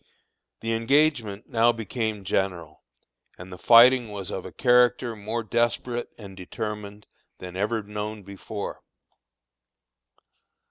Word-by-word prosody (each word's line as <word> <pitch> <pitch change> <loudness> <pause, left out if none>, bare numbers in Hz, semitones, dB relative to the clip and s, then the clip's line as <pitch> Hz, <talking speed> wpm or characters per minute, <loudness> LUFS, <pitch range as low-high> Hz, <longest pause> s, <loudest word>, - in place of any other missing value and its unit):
The 115 0 -1
engagement 115 -3 +1
now 115 +1 +3
became 110 -2 -4
general, 95 -2 -2 0.6
and 90 +1 -10
the - - -9
fighting 120 +1 +6
was 100 -1 -6
of 95 -2 -5
a - - -11
character 125 0 +3
more 110 +3 -4
desperate 120 +2 -1
and 100 -3 -11
determined 105 +2 -6 0.3
than 90 -1 -9
ever 105 +3 -1
known 105 0 -6
before. 100 +2 -7
110 Hz, 110 wpm, -25 LUFS, 100-120 Hz, 0.6 s, fighting